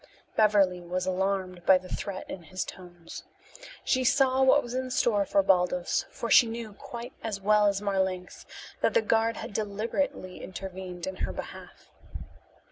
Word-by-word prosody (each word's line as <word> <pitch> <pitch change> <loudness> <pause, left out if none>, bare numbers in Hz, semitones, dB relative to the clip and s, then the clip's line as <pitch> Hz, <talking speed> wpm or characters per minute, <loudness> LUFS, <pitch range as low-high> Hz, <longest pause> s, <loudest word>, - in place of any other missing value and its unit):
Beverly 200 -4 +4
was 180 +1 -3
alarmed 185 -1 -1
by 190 +1 +6
the 185 0 -10
threat 190 0 -5
in 185 - -7
his 185 +3 -4
tones. 175 -2 -10 0.6
She 260 -1 +1
saw 265 0 +3
what 265 +2 +5
was 240 - -7
in 255 0 -2
store 220 -5 +2
for 200 - +3
Baldos, 180 -2 +2
for 235 - -5
she 240 - +8
knew 225 -2 -6
quite 235 +4 -8
as 215 -3 -3
well 210 +1 +4
as 200 0 0
Marlanx 190 -2 -2 0.3
that - - +2
the 475 - +4
guard 225 0 +2
had - - -7
deliberately 215 +1 -2
intervened 185 -2 -7
in 190 0 -5
her - - -2
behalf. - - -10
200 Hz, 160 wpm, -28 LUFS, 185-230 Hz, 0.6 s, she